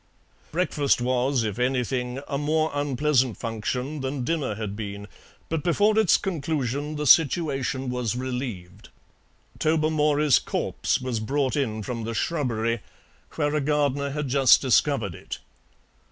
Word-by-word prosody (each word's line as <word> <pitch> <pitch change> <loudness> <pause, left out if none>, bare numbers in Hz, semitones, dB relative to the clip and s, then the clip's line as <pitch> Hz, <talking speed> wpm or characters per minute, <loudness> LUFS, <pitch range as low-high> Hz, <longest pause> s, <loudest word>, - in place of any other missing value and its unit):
Breakfast 150 -6 +1
was, 125 +1 +1
if 105 0 -3
anything, 125 0 -1
a 140 - -2
more 155 +2 +1
unpleasant 140 -3 +1
function 125 +6 -3
than 135 0 -3
dinner 140 -6 -1
had 105 -2 -4
been, 100 -1 -6 0.4
but 160 -2 -2
before 205 +5 +3
its 215 -6 +5
conclusion 150 - -2
the 150 0 -3
situation 140 -3 +3
was 125 -2 -2
relieved. 125 -8 -5 0.7
Tobermory's 150 -2 +3
corpse - - -1
was 125 -3 -2
brought 135 +5 0
in 110 -7 -1
from 115 +2 -4
the 115 +1 -4
shrubbery, 115 -7 -1 0.6
where 145 -2 0
a 150 - +1
gardener 140 -1 +1
had 150 0 -3
just 135 -1 +5
discovered 130 - +2
it. - - -7
135 Hz, 130 wpm, -25 LUFS, 120-150 Hz, 0.7 s, its